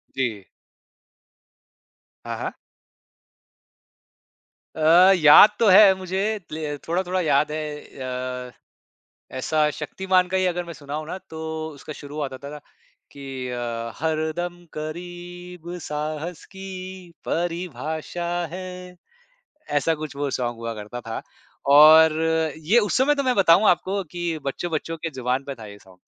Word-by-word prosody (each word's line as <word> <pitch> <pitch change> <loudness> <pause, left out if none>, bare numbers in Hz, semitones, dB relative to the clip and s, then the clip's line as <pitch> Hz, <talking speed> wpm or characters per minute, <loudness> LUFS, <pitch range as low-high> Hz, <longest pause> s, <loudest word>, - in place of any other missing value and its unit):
जी। 115 -7 -2 1.8
हाँ, - - -4
हाँ। - - -3 2.2
अ, 170 +4 +6
याद 155 +6 +9
तो 230 - +4
है 195 +1 +8
मुझे 190 0 -3 0.3
ले 155 -1 -4
थोड़ा-थोड़ा 180 +2 0
याद 150 -2 +2
है। 150 -1 -4 0.7
अ, - - -16 0.9
ऐसा 150 +3 +1
शक्तिमान 185 +4 +1
का 190 +1 0
ही 185 - +2
अगर 175 -1 0
मैं 170 - -8
सुनाऊँ 150 +1 -6
ना, 180 - -4
तो 160 0 -5
उसका 155 +2 -9
शुरुआत 145 -1 -6
आता 140 +2 -8
था 150 - -8 0.5
कि 135 -2 -6
अ, 120 -1 -4
हरदम 160 +3 -2
करीब 175 +2 -8
साहस 155 +3 -4
की 190 0 -9 0.6
परिभाषा 165 -1 -3 0.3
है, 180 0 -8 0.7
ऐसा 145 +3 +1
कुछ 150 -2 -7
वो 145 0 -2
सॉन्ग 120 -2 -2
हुआ 115 0 -4
करता 110 +3 -7
था, 115 -1 -5 0.4
और 155 +3 +8 0.4
ये 170 +10 +3
उस 205 -3 0
समय 275 +3 +3
तो 280 - -1
मैं 255 -2 +1
बताऊँ 195 +1 +5
आपको 190 +3 +1
कि 175 -2 -2
बच्चों-बच्चों 165 +3 -3
के 165 +1 -4
जुबान 130 +1 -1
पे 140 0 -6
था 115 -3 -10
ये 100 -1 -11
सॉन्ग। 95 -2 -20
160 Hz, 130 wpm, -23 LUFS, 140-175 Hz, 2.2 s, याद